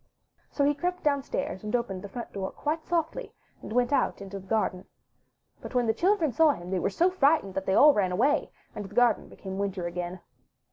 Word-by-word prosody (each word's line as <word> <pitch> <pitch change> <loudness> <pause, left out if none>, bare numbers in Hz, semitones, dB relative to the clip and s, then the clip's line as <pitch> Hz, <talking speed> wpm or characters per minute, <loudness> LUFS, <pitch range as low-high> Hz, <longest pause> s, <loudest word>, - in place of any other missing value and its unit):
So 285 - -1
he 290 - +3
crept 355 +5 -3
downstairs 280 -9 -1
and 210 +2 -1
opened 215 -6 -2
the 200 - -8
front 235 +4 -7
door 190 -1 -3
quite 310 +2 -3
softly, 340 +8 -2 0.3
and - - -9
went 245 +3 +1
out - - +1
into 195 0 -7
the 190 - -15
garden. 190 -4 -1 0.7
But - - -9
when 245 -1 +3
the 220 - +2
children 350 - +2
saw 315 +2 +4
him 175 -3 -9
they 190 - +1
were - - 0
so 345 - +2
frightened 290 - +2
that 190 0 -4
they 190 - +2
all 295 0 +8
ran 190 -5 +1
away, 265 +11 +2 0.2
and 210 - -5
the 200 +1 -11
garden 245 -1 +3
became 190 0 -7
winter 195 -3 -2
again. 175 +1 -4
230 Hz, 215 wpm, -28 LUFS, 190-295 Hz, 0.7 s, all